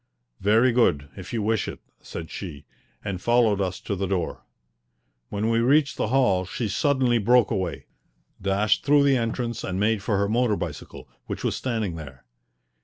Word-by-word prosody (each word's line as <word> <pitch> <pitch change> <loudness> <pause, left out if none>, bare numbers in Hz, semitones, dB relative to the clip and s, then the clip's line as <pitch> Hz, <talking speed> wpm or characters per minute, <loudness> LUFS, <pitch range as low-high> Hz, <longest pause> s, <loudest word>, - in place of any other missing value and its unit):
"Very 110 +6 +4
good, 85 - +2
if - - -9
you 115 -3 -1
wish 110 0 0
it," - - -6 0.2
said 80 -1 -8
she, 75 -7 -7 0.4
and 95 -3 -3
followed 115 -4 +3
us 95 -1 -2
to 100 - -3
the 95 +1 -2
door. 90 -3 -2 0.9
When 105 +2 -1
we 115 - +3
reached 140 +4 +3
the - - -1
hall 110 -7 +3
she 105 +4 -3
suddenly 130 +1 +2
broke 120 +1 +4
away, 95 -6 -2 0.6
dashed 100 +2 +1
through 145 0 +5
the 140 -1 +4
entrance, 115 0 -2
and 95 0 -3
made 105 0 +1
for 105 0 0
her 100 0 +1
motor 115 0 +2
bicycle, 80 -6 -7 0.2
which - - -5
was - - 0
standing 110 -9 -2
there. 65 -5 -10
105 Hz, 175 wpm, -25 LUFS, 95-120 Hz, 0.9 s, through